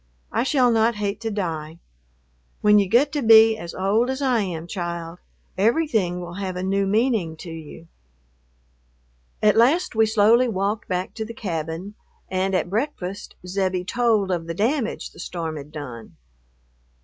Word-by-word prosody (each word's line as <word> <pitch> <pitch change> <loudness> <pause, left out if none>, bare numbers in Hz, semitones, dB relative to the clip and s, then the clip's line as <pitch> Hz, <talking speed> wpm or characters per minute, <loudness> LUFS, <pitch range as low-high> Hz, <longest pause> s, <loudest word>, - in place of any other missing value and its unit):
I 225 - +1
shall 255 -1 +3
not 225 0 +3
hate 210 0 -3
to 225 - -2
die. 165 -6 -4 0.8
When 210 0 +6
you 195 -2 0
get 265 +7 +4
to 295 - -1
be 225 -1 +7
as 170 -5 -8
old 210 +6 +1
as 265 +1 -2
I 260 -4 +2
am, 170 -4 -4
child, 170 -2 -5 0.4
everything 220 - +1
will 175 -1 -7
have 185 -2 -3
a 180 - -3
new 195 +1 +1
meaning 210 -6 +1
to 170 - -9
you." 160 0 -10 1.6
At 210 -1 +5
last 290 +11 +3
we 220 -1 +3
slowly 220 +3 +4
walked 205 0 -2
back 185 0 -2
to 220 - -4
the 230 +1 -8
cabin, 170 0 -4 0.4
and 190 +1 0
at 185 - 0
breakfast 200 -3 -4
Zebbie 185 -1 -1
told 220 -3 +1
of 170 -2 -2
the 165 - -4
damage 235 - -1
the - - -16
storm 165 -3 -4
had 145 0 -9
done. 125 -7 -9
200 Hz, 160 wpm, -23 LUFS, 175-225 Hz, 1.6 s, be